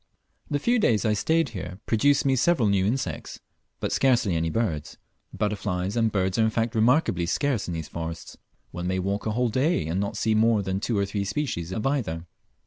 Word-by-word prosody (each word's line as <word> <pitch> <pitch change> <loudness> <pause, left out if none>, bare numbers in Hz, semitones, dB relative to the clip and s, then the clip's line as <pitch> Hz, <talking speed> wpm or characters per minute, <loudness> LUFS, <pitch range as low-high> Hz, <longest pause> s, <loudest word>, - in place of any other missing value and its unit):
The 145 - +1
few 240 - +2
days 115 - +2
I 110 - +3
stayed 160 +8 +1
here 95 -3 -7
produced 140 +6 +3
me 135 -1 +3
several 135 -3 +3
new 100 -1 +2
insects, 110 - -3 0.4
but - - -2
scarcely 120 -9 +2
any 80 0 0
birds. 80 -7 -2 0.3
Butterflies 100 -2 -2
and 115 -2 +2
birds 95 0 0
are - - +5
in 110 - +3
fact 115 +1 -1
remarkably 110 - +2
scarce 130 - 0
in 85 - -3
these 80 -2 -5
forests. 80 0 -6 0.4
One 90 +1 -4
may 95 0 0
walk 100 +4 -2
a 110 - 0
whole 125 +1 +1
day 130 - +1
and 85 +4 -1
not 100 +1 -2
see 110 0 +1
more 110 -1 +3
than 95 0 -2
two 110 +1 -1
or 100 - +2
three 100 +1 -2
species 100 - -3
of 105 +3 -3
either. 110 - -1
105 Hz, 205 wpm, -26 LUFS, 95-120 Hz, 0.4 s, are